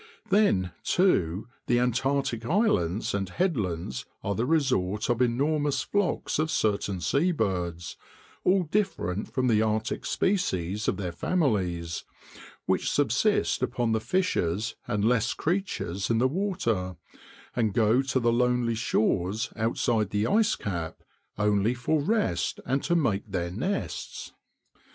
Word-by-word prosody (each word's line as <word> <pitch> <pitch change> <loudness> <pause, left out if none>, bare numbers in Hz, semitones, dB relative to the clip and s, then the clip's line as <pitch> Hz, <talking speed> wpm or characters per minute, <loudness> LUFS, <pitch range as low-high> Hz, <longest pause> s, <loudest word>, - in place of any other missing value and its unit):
Then, 100 - +3
too, 100 - +2 0.2
the 120 - +3
Antarctic 125 0 0
islands 115 - +1
and 95 -2 -1
headlands 90 - -2 0.2
are 100 - 0
the 115 +5 -1
resort 125 - +1
of 120 - 0
enormous 140 +3 +1
flocks 200 -6 -1
of 155 0 +1
certain 100 - 0
sea 140 - +2
birds, 90 - -2 0.5
all 185 0 +3
different 155 - -1
from 130 -1 0
the 110 -3 +4
Arctic 110 0 -1
species 105 - 0
of - - +1
their 90 -4 -3
families, 90 - -1 0.6
which - - +1
subsist - - +2
upon 120 -2 0
the 110 - +2
fishes 115 - 0
and 105 0 0
less 120 0 +2
creatures 155 - -2
in 115 - +2
the 125 +3 +3
water, 125 - -1 0.6
and 110 -3 +1
go 115 +3 +4
to 135 -1 0
the 120 -1 +2
lonely 125 -1 +2
shores 110 -2 0
outside 110 -1 0
the 105 +1 0
ice 220 - +3
cap 85 -5 -5 0.3
only 105 +2 +2
for 145 +5 0
rest 215 +7 0
and 135 +2 0
to 170 - +2
make 110 -10 0
their 85 -3 -2
nests. 185 - -4
115 Hz, 130 wpm, -27 LUFS, 95-145 Hz, 0.6 s, the